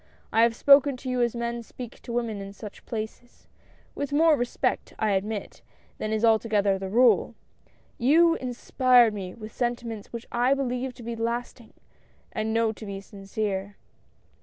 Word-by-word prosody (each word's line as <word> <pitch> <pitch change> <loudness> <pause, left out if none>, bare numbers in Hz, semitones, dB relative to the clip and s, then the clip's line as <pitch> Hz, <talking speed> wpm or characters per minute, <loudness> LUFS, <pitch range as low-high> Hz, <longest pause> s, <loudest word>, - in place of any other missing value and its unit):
I 225 - +4
have 230 0 +4
spoken 280 +1 +5
to 260 +1 -6
you 250 -1 0
as 240 0 +1
men 235 0 -3
speak 245 +1 -10
to 240 - -8
women 230 -4 -2
in 195 0 -8
such 205 0 -11
places 225 +2 -7 0.2
— - - -31
with 285 0 -4
more 315 +2 +5
respect, 245 -3 -2
I 215 -1 +1
admit, 200 +2 -3 0.4
than 215 - -3
is 220 +1 +1
altogether 215 -3 +2
the 190 0 -5
rule. 245 +5 +4 0.6
You 325 +7 +5
inspired 250 -2 +3
me 190 -3 -6
with 215 -1 -10
sentiments 240 -3 -3
which 235 0 -6
I 245 +3 +3
believe 255 -1 -2
to 245 - -11
be 235 +1 -4
last 235 +2 -3
ing, 225 - -20 0.6
and 220 -1 -2
know 225 0 +2
to 220 - -11
be 195 -1 -5
sincere. 195 0 -4
235 Hz, 170 wpm, -26 LUFS, 215-245 Hz, 0.6 s, spoken